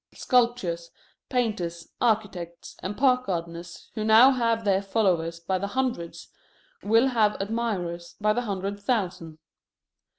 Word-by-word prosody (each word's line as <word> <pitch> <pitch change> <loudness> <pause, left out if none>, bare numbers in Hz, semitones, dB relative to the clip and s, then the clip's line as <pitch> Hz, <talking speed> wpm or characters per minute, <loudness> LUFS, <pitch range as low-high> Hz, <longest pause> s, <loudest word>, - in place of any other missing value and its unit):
Sculptors, 235 -10 +1 0.4
painters, 195 -10 -2
architects, 200 -7 -1
and 200 +3 -4
park 255 0 +3
gardeners 170 -1 -5
who 215 - -3
now 220 +5 +7
have 230 -3 0
their 195 -1 +3
followers 180 -5 0
by 185 +2 -1
the 200 - -2
hundreds 240 -8 -3 0.5
will 225 +5 +4
have 220 -4 +2
admirers 195 -6 -3
by 210 0 +2
the 245 - 0
hundred 200 -2 -3
thousand. 185 -8 -2
205 Hz, 125 wpm, -26 LUFS, 170-230 Hz, 0.5 s, now